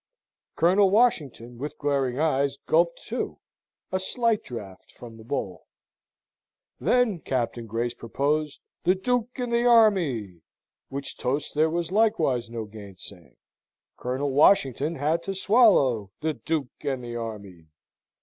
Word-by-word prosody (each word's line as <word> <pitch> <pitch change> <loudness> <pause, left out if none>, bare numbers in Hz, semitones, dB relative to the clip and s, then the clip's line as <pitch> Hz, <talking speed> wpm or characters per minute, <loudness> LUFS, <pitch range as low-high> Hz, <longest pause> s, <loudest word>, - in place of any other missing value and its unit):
Colonel 190 +3 +4
Washington, 145 - +1
with 150 +2 -5
glaring 140 -3 0
eyes, 140 -3 +1
gulped, - - +2
too, - - -4 0.5
a 185 - 0
slight 230 +3 0
draught 100 -7 -9
from 120 -2 -12
the 110 - -13
bowl. 110 -6 -4 1.1
Then 245 -7 +2
Captain 120 -4 -3
Grace 115 +2 -2
proposed 145 +6 -2 0.2
"The 180 +2 +3
Duke 245 +5 -1
and 245 -2 -3
the 235 +1 +3
Army," 165 - +3 0.5
which 140 0 -5
toast 140 +4 -2
there 155 +2 +3
was 170 +1 -2
likewise 165 - +1
no 115 -1 -5
gainsaying. 100 -4 -12 0.6
Colonel 130 +3 -2
Washington 145 - +3
had 155 +3 0
to 195 +3 -4
swallow 190 - +4
"The 155 0 0
Duke 140 +2 -4
and 135 -3 -2
the 120 0 -6
Army." 100 -8 -7
145 Hz, 130 wpm, -26 LUFS, 120-190 Hz, 1.1 s, Colonel